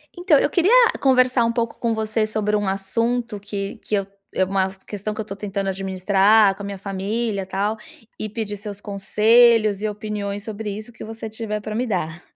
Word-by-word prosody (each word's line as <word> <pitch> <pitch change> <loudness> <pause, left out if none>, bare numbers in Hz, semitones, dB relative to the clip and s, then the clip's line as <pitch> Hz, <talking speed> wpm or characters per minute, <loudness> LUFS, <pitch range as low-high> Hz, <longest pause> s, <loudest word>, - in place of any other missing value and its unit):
Então, 350 -4 +4
eu - - +2
queria 365 +3 +2 0.3
conversar 255 -2 +4
um 230 - +1
pouco 230 -1 -2
com 235 -1 0
você 220 0 0
sobre 215 -1 0
um 205 -1 0
assunto 230 +4 -1
que 200 +1 -5
que 215 - -3
eu 195 -1 -1 0.3
é 190 - +3
uma 190 0 +1 0.2
questão 210 +1 -4
que 215 - -4
eu - - -4
estou 200 -2 -8
tentando 200 -1 -3
administrar 195 +2 +3
com 205 - -11
a - - -5
minha 200 -1 -5
família, 200 +2 -2
tal, 200 +3 -1 0.4
e 215 - -2
pedir 210 -1 -4
seus 205 -1 -7
conselhos 215 +1 +4
e 215 - 0
opiniões 205 -1 -4
sobre 220 0 -5
isso, 215 +3 -6
o - - -25
que - - -10
você 225 0 -7
tiver 215 -1 -4
pra 215 +1 -5
me 245 +4 -1
dar. 175 -5 -2
210 Hz, 205 wpm, -22 LUFS, 195-225 Hz, 0.4 s, Então